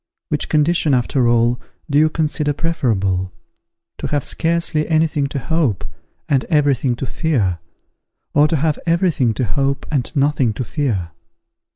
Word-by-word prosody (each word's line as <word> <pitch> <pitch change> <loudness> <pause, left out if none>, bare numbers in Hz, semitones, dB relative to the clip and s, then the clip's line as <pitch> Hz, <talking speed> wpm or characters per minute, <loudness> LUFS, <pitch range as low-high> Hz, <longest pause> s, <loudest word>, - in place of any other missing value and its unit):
Which - - -1
condition, 155 -1 +2
after 125 0 +1
all, 120 +1 +2 0.3
do 145 -1 +2
you 155 +1 +4
consider 155 -2 0
preferable, 100 - -1 0.7
to - - -3
have 145 -2 -1
scarcely 165 -2 0
any 160 0 +3
thing 145 -3 -1
to 140 - -5
hope, 135 - 0 0.4
and 135 -3 +2
every 150 -4 +3
thing 125 -1 -1
to 135 - -4
fear, 120 - 0 0.7
or 145 +1 +5
to 160 - 0
have 155 0 0
every 170 +2 +3
thing 125 -8 0
to 130 - 0
hope 135 +7 -1
and 140 -5 -1
nothing 140 -5 +2
to 125 - -3
fear? 110 - -2
140 Hz, 160 wpm, -19 LUFS, 120-155 Hz, 0.7 s, or